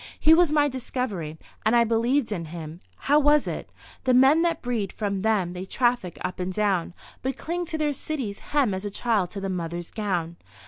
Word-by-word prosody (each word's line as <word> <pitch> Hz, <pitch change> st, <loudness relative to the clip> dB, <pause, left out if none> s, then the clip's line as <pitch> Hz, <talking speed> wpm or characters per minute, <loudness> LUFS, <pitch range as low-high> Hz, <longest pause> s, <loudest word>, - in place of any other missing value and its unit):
He 315 Hz, -, +6 dB
was 340 Hz, -2 st, +5 dB
my 295 Hz, -1 st, +4 dB
discovery 245 Hz, -, -4 dB, 0.3 s
and 220 Hz, +2 st, +3 dB
I 235 Hz, -, +6 dB
believed 235 Hz, +3 st, +1 dB
in 175 Hz, -5 st, -3 dB
him. 160 Hz, 0 st, -8 dB, 0.3 s
How 290 Hz, +2 st, +5 dB
was 295 Hz, 0 st, +4 dB
it? -, -, -4 dB, 0.3 s
"The 255 Hz, -1 st, +3 dB
men 270 Hz, +5 st, +6 dB
that 335 Hz, -1 st, 0 dB
breed 230 Hz, -6 st, -1 dB
from 200 Hz, -3 st, -2 dB
them 200 Hz, -5 st, +1 dB
they 180 Hz, 0 st, -5 dB
traffic 240 Hz, -4 st, 0 dB
up 180 Hz, 0 st, -4 dB
and 180 Hz, +1 st, -2 dB
down, 190 Hz, -3 st, 0 dB, 0.3 s
but 265 Hz, +1 st, -2 dB
cling 345 Hz, +1 st, -3 dB
to 320 Hz, -1 st, -2 dB
their 300 Hz, -1 st, 0 dB
cities' 260 Hz, -8 st, -4 dB
hem 275 Hz, -8 st, +1 dB
as 190 Hz, +1 st, -4 dB
a 205 Hz, -, -2 dB
child 205 Hz, -3 st, 0 dB
to 200 Hz, -, -6 dB
the 195 Hz, -, -3 dB
mother's 175 Hz, -2 st, -4 dB
gown." 175 Hz, -6 st, -2 dB
220 Hz, 200 wpm, -25 LUFS, 185-270 Hz, 0.3 s, He